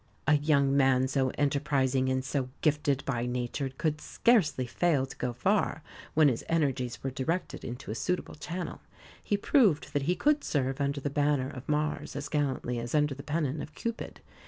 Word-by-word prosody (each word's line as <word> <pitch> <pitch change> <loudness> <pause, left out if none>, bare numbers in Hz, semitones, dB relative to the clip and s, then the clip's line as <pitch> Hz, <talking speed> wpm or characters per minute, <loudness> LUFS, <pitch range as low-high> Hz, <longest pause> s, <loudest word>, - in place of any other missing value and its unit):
A 150 - +4
young 140 -2 +2
man 130 -2 +4
so 130 -1 +1
enterprising 135 -2 +1
and 130 0 0
so 135 -2 -1
gifted 145 -2 +1
by 120 -3 -1
nature 125 +2 -2
could 150 +3 -2
scarcely 180 - +2
fail 140 +2 +1
to 135 - -11
go 125 - -2
far, 160 - 0 0.3
when 155 -1 +6
his 125 -5 0
energies 135 -7 0
were 135 - -2
directed 160 +8 -2
into 125 -2 -6
a - - -2
suitable 180 +10 -2
channel. 170 +3 -5 0.4
He 205 - 0
proved 205 - +3
that 145 - +1
he 180 - +3
could 295 +5 +2
serve 135 -1 -1
under 140 0 0
the 145 - -2
banner 145 -2 +1
of 130 +1 -9
Mars 150 -1 -1
as 140 0 -4
gallantly 135 -5 -1
as 120 +4 -3
under 150 -1 +3
the 135 - -8
pennon 150 0 -1
of 150 - -9
Cupid. 230 -1 -5
140 Hz, 180 wpm, -29 LUFS, 130-150 Hz, 0.4 s, when